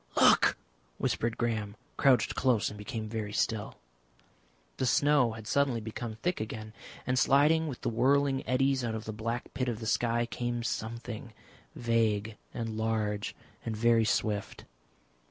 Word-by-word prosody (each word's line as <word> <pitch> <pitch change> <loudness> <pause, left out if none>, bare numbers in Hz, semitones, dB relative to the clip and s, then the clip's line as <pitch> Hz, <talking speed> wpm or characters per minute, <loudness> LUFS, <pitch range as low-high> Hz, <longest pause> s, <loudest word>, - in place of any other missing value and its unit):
"Look!" - - +6 0.4
whispered 115 0 -1
Graham, 110 -4 -1 0.2
crouched 135 -3 +4
close, 120 -5 +2
and 105 - -9
became 110 +1 -5
very 105 -1 -4
still. 110 -1 -1 1.0
The 130 - 0
snow 140 -2 +4
had 110 -1 -9
suddenly 135 0 +1
become 110 +1 -5
thick 175 +8 -2
again, 110 0 -6 0.3
and 125 +1 +1
sliding 150 +5 +4
with 135 -5 -6
the - - 0
whirling 135 +3 +2
eddies 135 0 +2
out 115 -2 -1
of 110 0 -5
the 110 - -4
black 115 +3 -4
pit 130 -1 -1
of 115 -2 -3
the 110 - -6
sky 120 +1 +1
came 120 0 -3
something, 115 0 -4 0.4
vague 110 -2 +1 0.2
and 115 -2 -4
large 110 -2 -1 0.3
and 110 -2 -3
very 115 0 +4
swift. 105 0 -1
115 Hz, 150 wpm, -30 LUFS, 110-125 Hz, 1.0 s, Look